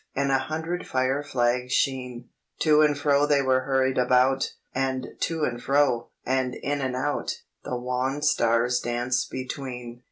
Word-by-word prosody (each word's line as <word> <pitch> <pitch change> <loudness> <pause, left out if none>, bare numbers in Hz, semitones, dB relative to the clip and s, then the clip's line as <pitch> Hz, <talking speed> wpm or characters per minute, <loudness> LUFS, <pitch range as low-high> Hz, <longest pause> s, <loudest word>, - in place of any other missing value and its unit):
And 140 0 +1
a 135 - +3
hundred 160 +6 -4
fire 130 +2 0
flags' 125 -2 0
sheen, 125 -2 -1 0.3
To 155 -1 +5
and 150 -2 +3
fro 145 0 +3
they 145 -2 +3
were 130 -1 +2
hurried 130 -1 +1
about! 125 +2 +2 0.2
And 130 -1 -1
to 165 -2 -1
and 120 -3 -1
fro, 140 -4 +2 0.2
and 130 0 0
in 145 +1 -2
and 130 -1 -2
out, 145 +3 -2 0.2
The 125 - -3
wan 125 +3 -2
stars 120 -3 +2
danced 120 +1 -1
between. 125 -2 -6
130 Hz, 155 wpm, -26 LUFS, 125-140 Hz, 0.3 s, To